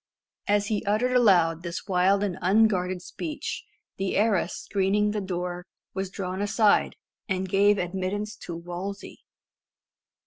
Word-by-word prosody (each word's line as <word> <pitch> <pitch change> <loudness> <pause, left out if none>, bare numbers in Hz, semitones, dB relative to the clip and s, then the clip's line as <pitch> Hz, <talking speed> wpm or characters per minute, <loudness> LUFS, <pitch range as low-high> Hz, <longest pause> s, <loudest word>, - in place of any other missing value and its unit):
As 205 0 +2
he 210 0 -1
uttered 215 +5 +1
aloud 175 -9 +4
this 170 +3 -6
wild 190 +1 +3
and 195 -4 -1
unguarded 185 -2 +2
speech, 305 - -5 0.3
the 195 -1 -1
arras 200 -4 +2
screening 205 +1 +1
the 210 0 -2
door 180 -1 -4 0.3
was 190 0 -3
drawn 190 0 -4
aside, 205 +1 +3 0.3
and 190 0 -1
gave 200 +2 +4
admittance 190 +4 -3
to 170 - -7
Wolsey. 175 +4 -6
195 Hz, 130 wpm, -26 LUFS, 180-205 Hz, 0.3 s, aloud